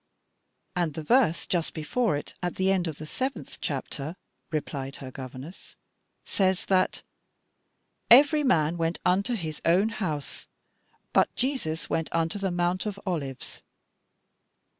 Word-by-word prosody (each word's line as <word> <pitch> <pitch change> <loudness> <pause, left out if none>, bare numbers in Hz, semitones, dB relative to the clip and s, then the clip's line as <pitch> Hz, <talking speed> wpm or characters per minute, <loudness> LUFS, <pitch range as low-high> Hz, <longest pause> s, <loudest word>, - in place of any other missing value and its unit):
"And 170 -5 0
the 160 - -4
verse 220 - +3
just 170 -3 -1
before 165 +4 +1
it, 145 - -7
at 175 -1 -2
the 190 +1 +2
end 185 -3 +1
of 160 - -3
the 155 - -8
seventh 260 - -4
chapter," 150 +4 -3 0.4
replied 140 -3 -3
her 130 -2 -8
governess, 130 +6 -9 0.5
"says 190 -2 +1
that 185 -1 +2 1.1
'every 290 +5 +8
man 165 - +3
went 165 0 0
unto 195 +6 +2
his 160 -7 -4
own 185 +6 +4
house,' 155 -10 -4 0.7
but - - +3
'Jesus 245 - -1
went 160 - -1
unto 165 +4 0
the 195 -1 0
Mount 175 +3 0
of 200 -1 -4
Olives.' 145 -8 -3
175 Hz, 135 wpm, -27 LUFS, 155-195 Hz, 1.1 s, every